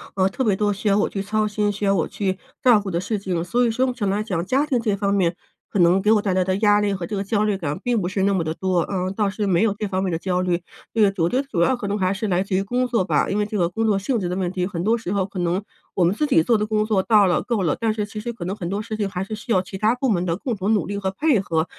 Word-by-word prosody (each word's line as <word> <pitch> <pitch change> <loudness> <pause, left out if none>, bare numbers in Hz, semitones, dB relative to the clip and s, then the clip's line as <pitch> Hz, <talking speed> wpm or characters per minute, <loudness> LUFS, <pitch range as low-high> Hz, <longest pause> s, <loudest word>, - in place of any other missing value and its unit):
呃， 190 -1 +2
特 260 +7 -2
别 205 -4 +2
多 205 +1 +1
需 205 +1 -4
要 200 - +4
我 - - +1
去 195 - -5
操 215 +1 0
心、 210 0 0
需 205 +1 -6
要 200 0 +3
我 165 - 0
去 190 -2 -2 0.2
照 245 -4 +6
顾 200 -2 -5
的 170 0 -1
事 215 +3 -2
情。 180 -4 -2
所 240 +7 +1
以 235 - +1
说 255 +3 +1
目 250 - -1
前 215 -5 -2
来 200 +2 0
讲， 185 -6 -2
家 275 +8 +1
庭 255 -4 +1
这 220 -3 0
方 200 0 -1
面 180 -4 +1 0.4
可 200 - -1
能 175 +2 +5
给 210 +2 +2
我 215 - +4
带 195 -3 -1
来 185 - +3
的 185 +1 0
压 205 0 +4
力 205 -1 0
和 180 -3 -4
这 210 - -4
个 195 - -1
焦 205 +1 0
虑 210 -2 +1
感 160 -2 -3
并 240 -3 +1
不 175 - -2
是 190 +1 -2
那 200 +1 +2
么 175 - 0
的 160 - -2
多， 185 0 0
呃， 185 +1 -2
倒 205 +2 0
是 205 0 -2
没 185 +1 +3
有 220 -3 +2
这 210 - -1
方 190 0 -1
面 185 - -1
的 165 - -1
焦 180 0 -1
虑。 180 -1 0 0.3
这 225 - +1
个 210 - +6 0.2
我 - - +3
觉 255 +9 +1
得 280 - -13
主 175 -10 -1
要 255 - +3
可 230 -5 -5
能 205 - -1
还 185 -1 +1
是 210 +3 -3
来 185 -1 +1
自 195 - -6
于 190 - +2
工 245 +5 -1
作 230 -6 +1
吧， 185 - +1
因 205 - 0
为 210 - 0
这 210 - -3
个 175 -3 +2
工 225 +6 -3
作 205 - +3
性 230 +5 -1
质 180 -3 -2
的 180 - -2
问 185 -2 -1
题， 180 -1 -1
很 175 -4 -4
多 220 +4 +3
时 225 -5 -5
候 200 -2 +1
可 190 -1 -7
能 175 +3 0 0.3
我 185 - +2
们 175 +2 +3
自 300 +8 0
己 165 - +4
做 230 +3 +3
的 210 - 0
工 215 0 0
作 215 -3 +2
到 210 0 +4
了、 180 - +2
够 230 -5 -1
了， 160 - 0
但 225 -2 +1
是 210 -1 -2
其 210 +1 -7
实 235 +3 -4
可 225 - -8
能 185 - -3
很 175 -5 -5
多 200 +3 -2
事 215 0 -5
情 205 -2 0
还 185 -1 -3
是 195 - -7
需 230 +3 -6
要 185 - +3
其 190 +1 -8
它 215 +4 +2
部 260 +1 -1
门 180 -5 +1
的 165 -2 0
共 240 +6 -3
同 195 +3 +1
努 210 - +1
力 200 +1 -4
和 195 -1 -1
配 285 +2 +2
合， 165 -4 0
200 Hz, 375 characters per minute, -22 LUFS, 185-215 Hz, 0.4 s, 照